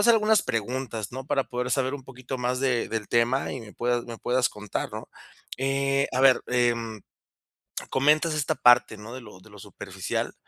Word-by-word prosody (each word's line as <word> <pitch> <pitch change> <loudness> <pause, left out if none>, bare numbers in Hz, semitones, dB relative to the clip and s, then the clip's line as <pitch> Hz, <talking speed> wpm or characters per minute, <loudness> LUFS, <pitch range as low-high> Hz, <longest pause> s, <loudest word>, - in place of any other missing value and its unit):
hacer 235 +2 +6
algunas 215 -1 +4
preguntas, 115 -1 -3
¿no?, 130 +1 -6
para 135 -2 +1
poder 125 +1 -3
saber 130 +1 +1
un 135 -2 -8
poquito 130 0 -7
más 125 +1 -1
de 130 -3 +1
del 110 -2 -3
tema 120 +3 +1
y 130 - -5
me 105 -2 -11
puedas 120 0 -1
me 115 -1 -8
puedas 125 0 +1
contar, 105 -1 -4
¿no? - - -7 0.5
Eh, 135 +1 +1
a 130 - +1
ver, 135 -1 +6
em, 115 -3 0 0.9
comentas 155 +4 +3
esta 150 -3 0
parte, 120 -3 +5
¿no?, 105 +3 -9
de 130 - -7
lo 105 -5 -13
de 110 - -18
lo 105 -1 -14
superficial, - - -4
125 Hz, 190 wpm, -26 LUFS, 115-135 Hz, 0.9 s, hacer